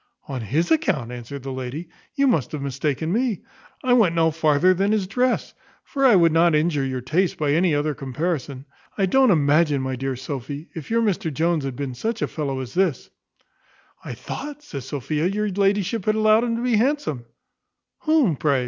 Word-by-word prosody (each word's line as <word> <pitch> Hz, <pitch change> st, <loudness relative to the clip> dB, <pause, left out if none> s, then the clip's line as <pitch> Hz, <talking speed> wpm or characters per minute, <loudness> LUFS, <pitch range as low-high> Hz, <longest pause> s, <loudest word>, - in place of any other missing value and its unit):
"On 135 Hz, -3 st, -4 dB
his 145 Hz, -, -1 dB
account!" 185 Hz, -, +1 dB
answered 125 Hz, +3 st, -8 dB
the 135 Hz, -, -5 dB
lady: 130 Hz, +6 st, -5 dB, 0.3 s
"You 280 Hz, -1 st, +2 dB
must 165 Hz, -, +1 dB
have 150 Hz, -, -3 dB
mistaken 140 Hz, +4 st, -2 dB
me; 235 Hz, -4 st, 0 dB, 0.4 s
I 255 Hz, -1 st, +3 dB
went 210 Hz, -9 st, +4 dB
no 165 Hz, -1 st, +3 dB
farther 155 Hz, +3 st, +3 dB
than 195 Hz, +3 st, +1 dB
his 210 Hz, -3 st, +1 dB
dress; 245 Hz, +6 st, 0 dB, 0.3 s
for 275 Hz, -, -3 dB
I 235 Hz, -, +6 dB
would 170 Hz, -3 st, +5 dB
not 165 Hz, 0 st, +4 dB
injure 150 Hz, -2 st, +1 dB
your 130 Hz, -1 st, -3 dB
taste 165 Hz, +9 st, 0 dB
by 150 Hz, -2 st, 0 dB
any 165 Hz, +1 st, +3 dB
other 150 Hz, +1 st, 0 dB
comparison 140 Hz, 0 st, -4 dB, 0.3 s
I 195 Hz, -, +2 dB
don't 260 Hz, +7 st, +4 dB
imagine, 150 Hz, -3 st, +3 dB
my 130 Hz, 0 st, -2 dB
dear 135 Hz, +1 st, -3 dB
Sophy, 140 Hz, +3 st, -6 dB
if 160 Hz, -4 st, -8 dB
your 230 Hz, 0 st, +2 dB
Mr 185 Hz, -6 st, 0 dB
Jones 160 Hz, 0 st, 0 dB
had 135 Hz, -2 st, -4 dB
been 135 Hz, -1 st, -4 dB
such 225 Hz, -, -3 dB
a -, -, 0 dB
fellow 140 Hz, -4 st, -3 dB
as 125 Hz, -2 st, -8 dB
this 180 Hz, -7 st, 0 dB, 0.4 s
" -, -, -34 dB
"I -, -, -6 dB
thought," 295 Hz, 0 st, -7 dB
says 140 Hz, -, -7 dB
Sophia, 150 Hz, +3 st, -2 dB
"your 210 Hz, +2 st, -1 dB
ladyship 200 Hz, +1 st, 0 dB
had 215 Hz, -, +2 dB
allowed 215 Hz, +2 st, +4 dB
him 230 Hz, -1 st, -1 dB
to 235 Hz, -, -3 dB
be 245 Hz, -3 st, +2 dB
handsome" 240 Hz, -, 0 dB, 0.7 s
"Whom, 300 Hz, -, +2 dB
pray?" 140 Hz, -2 st, +2 dB
165 Hz, 195 wpm, -23 LUFS, 140-210 Hz, 0.7 s, I